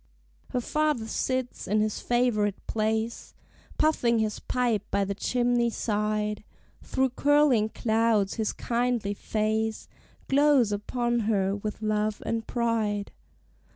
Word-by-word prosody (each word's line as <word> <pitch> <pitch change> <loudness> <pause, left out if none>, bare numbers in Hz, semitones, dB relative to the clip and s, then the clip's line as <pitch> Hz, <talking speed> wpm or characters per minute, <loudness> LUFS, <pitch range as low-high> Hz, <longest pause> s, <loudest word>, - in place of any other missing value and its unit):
Her 250 - -1
father 300 -3 0
sits 255 +2 -2
in 210 +2 +2
his 215 0 0
favorite 230 -5 0
place, 220 +1 -2 0.4
Puffing 245 -7 +2
his 215 -1 -1
pipe 240 -5 0
by 200 0 +1
the 200 - -2
chimney 240 +2 +1
side; 210 -1 -1 0.4
Through 265 -1 0
curling 275 -5 +3
clouds 220 -3 +1
his 220 -2 -1
kindly 235 -4 -1
face 220 +1 -1 0.4
Glows 275 -5 +4
upon 240 +3 -1
her 195 -2 +1
with 210 +1 -5
love 215 0 0
and 225 -1 -2
pride. 220 -4 -1
220 Hz, 120 wpm, -27 LUFS, 210-245 Hz, 0.4 s, Glows